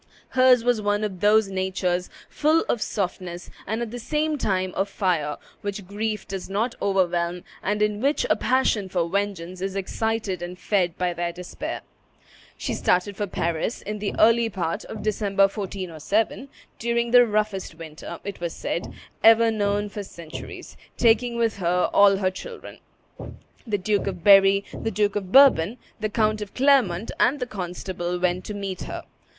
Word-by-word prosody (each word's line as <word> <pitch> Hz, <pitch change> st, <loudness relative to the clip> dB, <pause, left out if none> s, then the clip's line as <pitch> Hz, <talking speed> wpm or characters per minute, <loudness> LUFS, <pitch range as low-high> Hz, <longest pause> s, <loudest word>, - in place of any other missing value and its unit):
Hers 255 Hz, -2 st, +5 dB
was 240 Hz, -2 st, +2 dB
one 205 Hz, 0 st, 0 dB
of 195 Hz, -4 st, -3 dB
those 210 Hz, +1 st, +4 dB
natures, 185 Hz, -1 st, -1 dB, 0.2 s
full 310 Hz, +2 st, +2 dB
of 235 Hz, -, 0 dB
softness 180 Hz, -2 st, -4 dB, 0.2 s
and 220 Hz, +4 st, -1 dB
at 225 Hz, -, -6 dB
the 245 Hz, -, -6 dB
same 300 Hz, +5 st, 0 dB
time 185 Hz, -8 st, -1 dB
of 195 Hz, +1 st, -1 dB
fire, 170 Hz, -7 st, 0 dB, 0.2 s
which 200 Hz, -1 st, -4 dB
grief 210 Hz, +2 st, -3 dB
does 195 Hz, -1 st, -6 dB
not 220 Hz, +5 st, 0 dB
overwhelm, 180 Hz, -2 st, 0 dB, 0.2 s
and 210 Hz, +1 st, 0 dB
in 210 Hz, 0 st, 0 dB
which 280 Hz, +3 st, +1 dB
a -, -, +3 dB
passion 235 Hz, -6 st, +1 dB
for 175 Hz, -2 st, 0 dB
vengeance 185 Hz, -2 st, -3 dB
is 195 Hz, 0 st, -3 dB
excited 210 Hz, 0 st, -2 dB
and 175 Hz, +1 st, -6 dB
fed 180 Hz, -4 st, 0 dB
by 180 Hz, -1 st, 0 dB
their 170 Hz, 0 st, -2 dB
despair. 180 Hz, +1 st, -6 dB, 0.8 s
She -, -, -3 dB
started 185 Hz, +3 st, +1 dB
for 205 Hz, +1 st, -2 dB
Paris 170 Hz, +4 st, -2 dB
in 210 Hz, +1 st, -5 dB
the 205 Hz, -1 st, -3 dB
early 230 Hz, +1 st, +5 dB
part 175 Hz, -5 st, -3 dB
of 215 Hz, -, -7 dB
December, 205 Hz, -2 st, +1 dB
1407, 195 Hz, -, -1 dB, 0.3 s
during 235 Hz, 0 st, 0 dB
the 245 Hz, -1 st, +7 dB
roughest 210 Hz, -5 st, -1 dB
winter, 160 Hz, -2 st, -9 dB
it 200 Hz, -1 st, -6 dB
was 170 Hz, -1 st, -3 dB
said, 170 Hz, -, -3 dB, 0.3 s
ever 225 Hz, 0 st, +7 dB
known 205 Hz, -1 st, 0 dB
for 205 Hz, 0 st, -6 dB
several 170 Hz, -5 st, -11 dB
centuries, -, -, -8 dB, 0.2 s
taking 235 Hz, +1 st, +3 dB
with 230 Hz, -3 st, +1 dB
her 180 Hz, -1 st, +1 dB
all 200 Hz, -1 st, +6 dB
her 190 Hz, -1 st, +1 dB
children. 470 Hz, -, -9 dB, 0.9 s
The 210 Hz, -2 st, 0 dB
Duke 200 Hz, +1 st, 0 dB
of 180 Hz, -3 st, -4 dB
Berry, 195 Hz, 0 st, +6 dB
the 225 Hz, -, -3 dB
Duke 210 Hz, -1 st, 0 dB
of 190 Hz, -3 st, -3 dB
Bourbon, 245 Hz, -6 st, +6 dB, 0.2 s
the 215 Hz, 0 st, -1 dB
Count 215 Hz, 0 st, +1 dB
of 205 Hz, -1 st, -7 dB
Clermont, 250 Hz, -8 st, +3 dB
and 280 Hz, +4 st, +3 dB
the 250 Hz, -, -1 dB
constable 180 Hz, -3 st, -4 dB
went 180 Hz, 0 st, 0 dB
to 210 Hz, -, -5 dB
meet 195 Hz, -2 st, -4 dB
her. -, -, -6 dB
200 Hz, 170 wpm, -24 LUFS, 180-220 Hz, 0.9 s, the